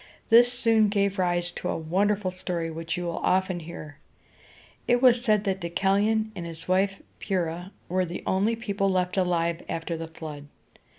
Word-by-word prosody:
This 240 +1 +7
soon 225 -4 +3
gave 200 -1 0
rise 175 -1 +1
to 180 - -5
a - - -1
wonderful 190 +4 0
story, 175 -2 -3
which 165 +1 -4
you 180 - -3
will 170 -1 -3
often 185 -1 +1
hear. 155 -3 -9 0.9
It 245 0 +4
was 245 -1 +5
said 215 -4 +3
that 195 -2 -1
Deucalion 200 +5 +1
and 175 - -5
his 165 -1 -8
wife 195 +1 +1 0.2
Pyr´rha 175 -2 -2 0.2
were 185 +1 +1
the 175 +1 -6
only 205 +5 +1
people 200 -3 -1
left 180 -1 0
alive 170 -3 0
after 165 +1 -3
the 165 0 -5
flood. 155 -3 -9
185 Hz, 170 wpm, -26 LUFS, 170-205 Hz, 0.9 s, This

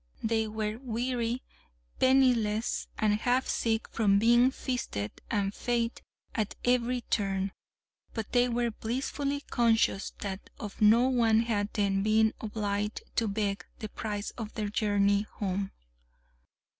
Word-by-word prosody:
They 220 0 +1
were 215 0 -3
weary, 245 0 -2 0.6
penniless, 245 -5 +3
and 210 -1 +2
half 250 +3 +1
sick 225 -1 0
from 200 -3 +3
being 240 +4 +5
feasted 245 - -3 0.2
and 200 -2 0
fêted 235 0 -1 0.3
at 215 -2 -2
every 245 0 +2
turn, 195 -3 -1 0.6
but 225 -2 -4
they 245 0 +3
were 240 0 0
blissfully 275 +5 -2
conscious 225 -6 +2
that 195 -1 -5
of 205 -2 -7
no 225 +4 +6
one 230 -4 +4
had 210 -3 0
they 205 -1 +2
been 215 +3 +3
obliged 210 -1 -2
to 225 - +2
beg 200 -1 -1
the 215 -3 -6
price 205 -1 -4
of 220 -1 -6
their 210 -2 -2
journey 205 -1 +2
home. 195 -1 -2
220 Hz, 130 wpm, -29 LUFS, 205-240 Hz, 0.6 s, no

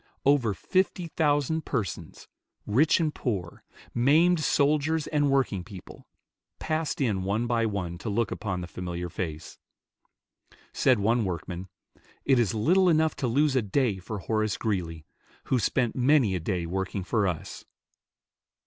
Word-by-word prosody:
Over 130 -7 +3
fifty 185 - 0
thousand 150 0 +1
persons, 85 - -4 0.4
rich 135 +10 +3
and 155 -3 0
poor, 95 -9 -4 0.3
maimed 155 +8 +4
soldiers 150 +1 +1
and 145 -1 +1
working 130 -9 +1
people, 95 -2 -12 0.5
passed 155 -2 -2
in 105 -8 +1
one 100 +5 -1
by 115 -1 +1
one 90 -5 -4
to 115 - -5
look 105 +1 0
upon 95 -4 -3
the 85 - -6
familiar 90 0 -5
face. 80 -2 -6 1.1
Said 130 -2 +3
one 115 +3 +2
workman, 90 0 -5 0.6
"It 135 -2 +4
is 115 -4 +1
little 180 - +3
enough 160 -1 +2
to 130 - -1
lose 140 +4 +2
a 130 - +3
day 110 -1 0
for 105 +4 -6
Horace 110 +1 -1
Greeley, 85 -8 -3 0.4
who 130 - +1
spent 120 0 0
many 130 -5 +3
a 90 - -1
day 85 0 -2
working 95 +2 -3
for 105 +1 +1
us." 85 -4 -5
115 Hz, 145 wpm, -27 LUFS, 95-145 Hz, 1.1 s, maimed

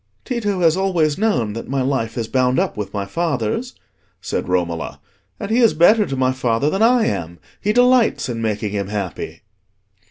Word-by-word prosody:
"Tito 210 -7 -2
has 165 -1 +4
always 180 -5 +1
known 125 - +1
that 115 - -7
my 135 -1 0
life 125 -4 -2
is 115 -2 -2
bound 130 +1 +1
up - - 0
with 105 -2 -5
my 100 -1 -3
father's," 160 - -2 0.4
said - - -3
Romola; 85 -3 -2 0.4
"and 200 - -5
he 230 - +3
is 230 -9 +4
better 205 +6 +5
to 135 - -3
my 130 0 +2
father 130 +2 0
than 195 - -1
I 235 0 +4
am: 85 - -3 0.2
he 210 - +1
delights 245 0 +3
in 115 -2 -4
making 105 -2 -2
him 100 -2 -2
happy." 100 -3 -5
135 Hz, 185 wpm, -20 LUFS, -, 0.4 s, better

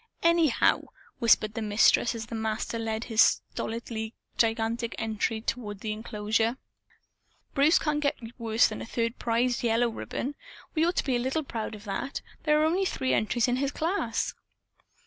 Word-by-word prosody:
"Anyhow," 335 -4 +3 0.3
whispered 220 -3 +4
the 225 - -3
Mistress 215 +3 +4
as 230 0 -5
the 230 - -10
Master 220 +1 -2
led 220 0 -2
his 225 -2 +3
stolidly 225 -1 0 0.2
gigantic 225 +1 0
entry 220 0 -1
toward 215 -4 -4
the 215 - -2
enclosure, 220 +2 -1 1.0
"Bruce 290 +5 +5
can't 300 -1 0
get 285 -1 +1 0.2
worse 225 0 +3
than - - -6
a - - -5
third 230 +1 -2
prize 240 +1 +1
yellow 235 0 +2
ribbon. 250 +4 -4 0.4
We 320 0 +2
ought 350 - 0
to - - +1
be 265 -3 +1
a - - +1
little 265 +6 -1
proud 225 -5 -4
of 210 - -12
that. 205 +6 -4 0.2
There 300 -1 +4
are 310 - +4
only 355 +5 +2
three 260 -8 0
entries 230 +2 +2
in 245 0 +1
his 275 +1 0
class." 315 - -1
230 Hz, 165 wpm, -28 LUFS, 220-265 Hz, 1.0 s, Bruce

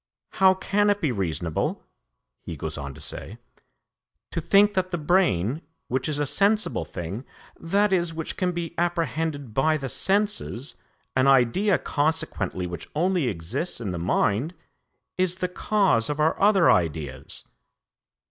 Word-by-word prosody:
'How 190 -1 +5
can 205 +2 +1
it 205 0 +2
be 155 -8 0
reasonable,' 85 -6 -2 0.6
he 85 - -7
goes 80 +2 -4
on 70 -2 -6
to - - -12
say, - - -4 0.9
'to - - -2
think 205 +1 +4
that 185 -2 0
the 175 - -2
brain, 150 - +1 0.3
which 130 +3 -1
is 150 - 0
a 145 - 0
sensible 205 +8 +1
thing, 90 +8 -6 0.4
i.e. 195 +2 +3
which 160 -1 -5
can 180 -1 0
be 170 -1 -4
apprehended 160 -6 -1
by 155 +6 +2
the 135 -3 -5
senses 195 - -1 0.4
an 130 +1 +3
idea 135 - +4
consequently 145 - -1
which 85 -1 -7
only 175 -2 +1
exists 115 - -3
in 105 -5 -3
the 85 - -4
mind 105 - 0 0.6
is 185 -1 +1
the 185 0 -2
cause 180 - +1
of 150 0 -2
our 155 +2 +3
other 200 -3 +5
ideas?'" 75 -5 -2
155 Hz, 145 wpm, -25 LUFS, -, 0.9 s, How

